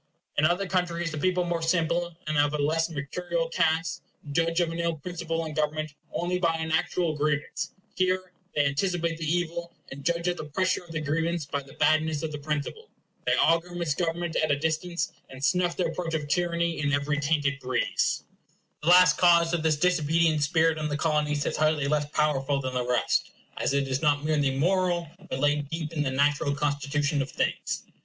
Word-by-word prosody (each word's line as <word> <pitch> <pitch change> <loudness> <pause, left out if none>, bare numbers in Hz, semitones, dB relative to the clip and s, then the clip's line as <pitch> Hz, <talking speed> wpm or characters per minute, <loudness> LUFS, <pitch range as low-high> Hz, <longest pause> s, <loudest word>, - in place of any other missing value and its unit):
In 150 - +3
other 175 +4 +2
countries, 175 -2 -1
the 155 - -4
people, 180 +2 +1
more 170 -1 -1
simple, 170 0 0
and 155 0 -2
of 145 +1 +2
a - - 0
less 160 +3 +1
mercurial 165 +3 -3
cast, 165 +1 +1 0.3
judge 165 +3 +1
of 170 -2 +1
an 165 - -5
ill 170 -1 0
principle 165 +1 -4
in 155 - -5
government 155 0 -1 0.2
only 180 +1 -1
by 165 -2 +2
an 160 0 -3
actual 160 0 +1
grievance; 145 -1 -1 0.3
here 185 0 0 0.2
they 145 - +3
anticipate 165 +3 0
the 155 -1 -1
evil, 170 0 -2 0.2
and 140 +1 -8
judge 170 +2 0
of 175 0 0
the - - -5
pressure 185 +5 0
of 170 - -13
the 160 -1 -3
grievance 165 +2 -1
by 140 0 -3
the 135 -1 -15
badness 155 -1 +2
of 160 - -2
the 150 - -5
principle. 150 - -4 0.4
They - - +4
augur 170 +2 +2
misgovernment 170 +1 -1
at 155 - +1
a 145 - +3
distance, 160 +3 -1 0.2
and 135 +1 -4
snuff 180 -2 +1
the 180 - +1
approach 165 -2 -2
of 150 -2 -2
tyranny 170 +1 0
in 145 -1 0
every 145 +1 0
tainted 145 -1 +1
breeze. 130 -2 0 0.6
The 155 - 0
last 180 +1 +7
cause 170 -1 +5
of 170 - +1
this 155 -1 +2
disobedient 165 -2 +2
spirit 160 +1 +2
in 155 - -1
the 145 -1 -2
Colonies 150 -2 0
is - - -1
hardly 155 -2 +2
less 150 0 0
powerful 145 -2 +1
than 130 -1 -3
the 125 -1 -1
rest, 125 0 +1 0.3
as 140 - 0
it 140 -1 +1
is 130 0 -1
not 145 -2 +2
merely 145 -3 +1
moral, 175 +1 +1 0.2
but - - -2
laid 145 0 +1
deep 160 -1 -4
in 155 - -1
the 140 - 0
natural 140 +2 +1
constitution 145 +1 0
of 135 - -3
things. - - -2
160 Hz, 195 wpm, -27 LUFS, 145-170 Hz, 0.6 s, last